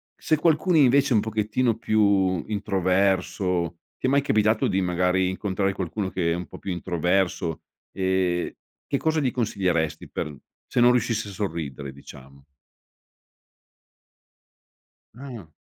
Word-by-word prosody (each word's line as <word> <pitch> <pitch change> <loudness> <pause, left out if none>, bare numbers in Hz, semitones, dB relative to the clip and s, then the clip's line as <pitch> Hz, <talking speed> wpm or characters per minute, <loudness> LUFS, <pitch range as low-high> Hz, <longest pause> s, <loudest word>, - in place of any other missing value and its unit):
se 155 - 0
qualcuno, 165 +3 +2
invece, 140 -1 +4
è - - +4
un 105 - +4
pochettino 110 +2 0
più 100 -5 +2
introverso, 95 -3 0 0.2
ti - - -1
è - - +2
mai 140 +1 +4
capitato 110 -4 +2
di, 95 - +1
magari, 90 +1 +1
incontrare 95 0 -1
qualcuno 95 +2 -3
che 85 -3 0
è - - -1
un 90 - -5
po' - - -11
più 95 - -5
introverso? 90 -1 0 0.3
Ehm, 95 -2 0 0.4
che 140 - 0
cosa 160 +1 +1
gli 130 - +1
consiglieresti 95 -10 -1
per 75 -1 -4 0.3
se - - -1
non 120 0 +7
riuscisse 115 -3 0
a - - -8
sorridere, 80 -9 -4
diciamo? 70 0 -14 2.7
Ah. 120 - -9
95 Hz, 135 wpm, -25 LUFS, 90-110 Hz, 2.7 s, non